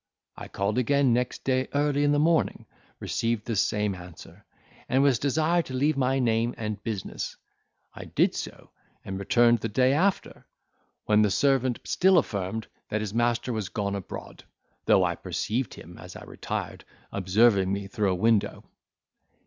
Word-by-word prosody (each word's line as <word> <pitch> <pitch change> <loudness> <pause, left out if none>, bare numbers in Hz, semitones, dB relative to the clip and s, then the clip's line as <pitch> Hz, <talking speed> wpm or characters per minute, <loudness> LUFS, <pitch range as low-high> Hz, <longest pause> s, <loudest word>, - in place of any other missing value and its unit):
I - - -9
called 100 +4 -1
again 140 0 +3
next 125 +1 -2
day 130 0 0
early 145 0 +2
in 145 - +3
the 145 - +2
morning, 160 +2 +1 0.3
received 115 -2 -2
the 115 - -2
same 105 +1 +1
answer, 90 -3 -12 0.5
and 130 +2 +3
was 135 -5 +3
desired 160 +5 +1
to 130 - -6
leave 145 +4 +2
my 135 0 +1
name 115 -1 +1
and 110 -1 -5
business: 105 -5 -5 0.6
I - - -9
did - - +1
so, - - -7 0.3
and 95 0 -5
returned 120 +4 +3
the 115 - -3
day 130 +5 +3
after, 185 +7 -1 0.6
when 105 0 +4
the 105 - +3
servant 130 +2 +1
still 190 0 +3
affirmed 100 - -1 0.2
that 110 - -1
his 105 -2 -4
master 120 +1 0
was 105 -4 -3
gone 100 -1 -2
abroad; 100 -3 -8 0.4
though - - +5
I - - +1
perceived 115 +2 -3
him, - - -12
as - - -11
I - - -9
retired, - - -5 0.3
observing 100 0 +3
me 100 0 -2
through 105 0 -1
a 95 - +1
window. 110 +2 +1
115 Hz, 165 wpm, -26 LUFS, 105-135 Hz, 0.6 s, though